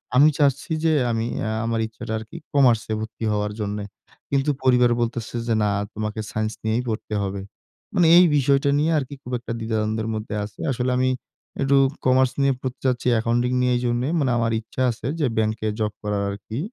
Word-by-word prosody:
আমি 145 +4 +7
চাচ্ছি 145 +3 +1
যে, 160 -1 +3 0.2
আমি 115 0 -1 0.2
এ্যা 110 - -1
আমার 115 -1 0
ইচ্ছাটা 110 0 -7
আরকি 110 0 -10 0.2
কমার্সে 120 -6 +3
ভর্তি 110 +1 -7
হওয়ার 105 0 -1
জন্যে। 105 0 -3 0.5
কিন্তু 140 +1 +1
পরিবার 125 -2 +4
বলতেছে 120 0 -3
যে, 115 - +2
না 105 - +2 0.2
তোমাকে 110 0 -4
সাইন্স 110 0 -2
নিয়েই 110 +3 0
পড়তে 110 0 -4
হবে। 100 0 -3 0.5
মানে 175 -3 +5
এই 180 - +8
বিষয়টা 140 +1 +3
নিয়ে 160 +2 +2
আরকি 140 +1 -6
খুব 125 - -8
একটা 120 - -7
দ্বিধাদ্বন্দ্বের 110 0 -1
মধ্যে 110 0 -4
আছে। 100 -1 -9
আসলে 125 +1 -1
আমি 130 0 +2 0.5
একটু 135 0 +3 0.3
কমার্স 130 0 +4
নিয়ে 140 0 +3
পড়তে 130 -1 -5
যাচ্ছি, 125 0 0
অ্যাকাউন্টিং 120 +2 +1
নিয়ে 125 0 +2
এই - - -3
জন্য 120 0 +1 0.2
মানে 135 -4 +1
আমার 115 -1 +1
ইচ্ছা 115 +3 -6
আছে 115 +2 -6
যে, 150 - +2
ব্যাংকে 110 0 0
জব 105 -1 0
করার 105 -1 -1
আরকি। 105 +5 -6
115 Hz, 185 wpm, -23 LUFS, 110-130 Hz, 0.5 s, এই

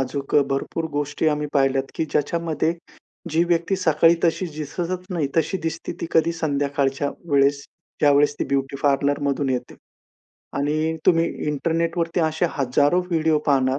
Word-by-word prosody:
अजूक 135 +1 -3 0.2
भरपूर 135 +4 -2
गोष्टी 145 +2 -1
आम्ही 150 0 -1
पाहिल्यात, 135 -1 +2
की 160 - -1
ज्याच्यामध्ये 165 +1 0 0.6
जी 165 +2 +3
व्यक्ती 170 +2 +1
सकाळी 165 -1 +4
तशी 170 +2 +1
दिसतच 175 +4 -4
नाही, 160 -6 -1
तशी 185 +4 +1
दिसते 165 - -4
ती - - -2
कधी 165 +1 +3
संध्याकाळच्या 145 -3 -1 0.2
वेळेस, 140 0 +3 0.4
ज्यावेळेस 145 0 +4
ती - - 0
ब्युटी 140 0 -1
पार्लर 140 0 +2
मधून 140 -1 0
येते. 125 -1 -3 0.8
आणि 155 +3 0
तुम्ही 165 -2 +5 0.2
इंटरनेटवरती 165 +3 -1
असे 160 +2 +1
हजारो 145 +6 +2
व्हिडिओ 160 -2 +2
पाहणार, 135 -1 +2
150 Hz, 140 wpm, -22 LUFS, 140-165 Hz, 0.8 s, तुम्ही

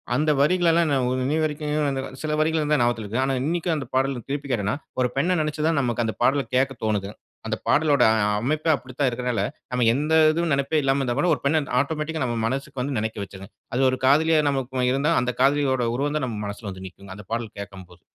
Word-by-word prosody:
அந்த 150 +3 +2
வரிகளெல்லாம் 170 +1 +3
நான் 130 -3 +1 0.2
இன்னிய 150 +5 0
வரைக்குங்க, 150 -2 -1 0.2
சில 155 -1 -2
வரிகள் 155 -1 +1
தான் 150 - +4
ஞாபகத்தில 120 -2 +1
இருக்கு. 115 +5 -2
ஆனா 135 - 0
இன்னைக்கும் 170 +2 0
அந்த 140 - -4
பாடல் 130 -2 0
திருப்பி 140 0 -3
கேட்டேன்னா 105 -1 0 0.3
ஒரு 125 - +3
பெண்ணை 175 +7 +2
நினைச்சு 150 0 -2
தான் 165 -3 +2
நமக்கு 120 -2 -1
அந்த 110 - -3
பாடலை 140 +1 +3
கேட்க 135 +1 +2
தோனுது. 105 -2 -1 0.4
அந்த - - -1
பாடலோட 150 -1 +3
அ 110 - +1 0.2
அமைப்பே 155 +6 0
அப்படித்தான் 130 +1 -3
இருக்கறனால, 125 -1 -2 0.3
நம்ம 125 -1 +1
எந்த 150 +4 -1 0.2
இதுவும் 170 0 -1
நினைப்பே 140 +3 +1
இல்லாம 135 0 +1
இருந்தா 120 -2 -1
கூட, 180 - +2
ஒரு - - -11
பெண்ணை 155 +3 +3 0.2
ஆட்டோமேட்டிக்கா 150 +2 -2
நம்ம 120 -1 -2
மனசுக்கு 135 +1 -4
வந்து 135 -1 -2
நினைக்க 110 -1 -3
வச்சுருங்க. 100 +1 -10 0.3
அது 130 +1 +3
ஒரு 130 - -2
காதலியா 155 +3 +4
நமக்கு 130 -2 -1
இருந்தா, 145 +4 +1
அந்த 125 0 -1
காதலியோட 135 -2 +2
உருவம் 145 +3 -1
தான் 135 - -1
நம்ம 110 -3 -5
மனசில 100 +1 -6
வந்து 95 0 -9
நிக்குங்க. 95 +2 -14
அந்த 105 0 -11
பாடல் 115 -2 -4
கேட்கும் 95 -2 -9
போது. 90 - -18
135 Hz, 210 wpm, -24 LUFS, 120-150 Hz, 0.4 s, தான்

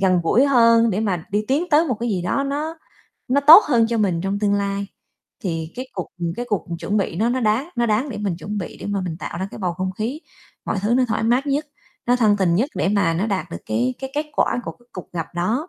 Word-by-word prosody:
gần 185 -2 +3
gũi 235 +11 +3
hơn 230 -3 +5
để 200 - -1
mà 185 -7 -1
đi 210 +1 0
tiến 290 +6 +2
tới 305 +3 +5
một 250 - +1
cái 240 - -1
gì 185 -4 -1
đó 275 +10 0
nó 305 +4 -3 0.5
nó 280 +3 +3
tốt 315 +8 +10
hơn 235 -5 +3
cho 230 -1 0
mình 185 -5 +1
trong 195 +2 -2
tương 205 -1 +1
lai. 200 0 -1 0.6
Thì 165 -2 -3
cái 255 +1 -5
cuộc, 180 - -4
ừm, 170 -1 -2
cái 245 - -3
cuộc 205 -4 -1
chuẩn 205 +4 -2
bị 190 -4 -1
nó 220 +5 +1
nó 255 +1 0
đáng 225 +8 +1
nó 235 0 +2
đáng 225 +7 +1
để 210 - -5
mình 195 -5 -2
chuẩn 205 +3 -5
bị 175 - -6
để - - -6
mà 205 -1 -1
mình 165 -3 -4
tạo 170 - -6
ra 190 - -3
cái - - -9
bầu 180 -3 -1
không 185 +1 -3
khí, 250 +9 -3 0.5
mọi - - -1
thứ 220 +4 +2
nó 255 0 +3
thoải 220 0 -1
mát 245 +5 +2
nhất, 285 +2 0 0.4
nó 245 - +4
thân 215 -4 +3
tình 180 -4 +2
nhất 250 - +1
để - - 0
mà 200 -5 +2
nó 190 +6 0
đạt 195 -3 -2
được - - -5
cái 120 +4 0
cái 265 0 -5
kết 300 +1 -1
quả 245 - +1
của - - -5
cái 240 - -27
cuộc 185 - -9
gặp 165 -2 -3
đó. 225 - -1
210 Hz, 270 wpm, -21 LUFS, 185-250 Hz, 0.6 s, tốt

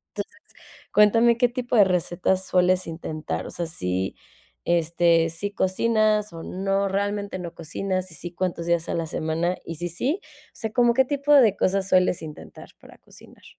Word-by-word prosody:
Entonces, - - -5 0.6
cuéntame 225 +3 +5
qué 245 - +4
tipo 245 0 -3
de 210 - +8
recetas 185 +1 0
sueles 180 0 +2
intentar, 155 - -5
o - - -7
sea, 170 -1 -4
sí, 95 - -3 0.5
este, 170 0 +2
¿sí 185 +5 -4
cocinas 210 0 +1
o 165 - -8
no, 195 +1 -1
realmente 200 0 -2
no 170 -1 -7
cocinas? 185 +3 -3
Si 165 - -10
si, 175 +2 -7
¿cuántos 175 -2 -3
días 170 -1 0
a - - -1
la 165 -1 -1
semana? 160 +3 -2
Y 165 - -6
si 175 +2 -4
sí, 280 - -1
o - - -22
sea, 220 -2 -4
¿cómo 240 0 +3
qué 265 0 +4
tipo 285 +1 +1
de 225 -8 +6
cosas 195 0 0
sueles 180 -2 +3
intentar 150 -1 -10
para - - -16
cocinar? - - -18
185 Hz, 175 wpm, -24 LUFS, 170-210 Hz, 0.6 s, de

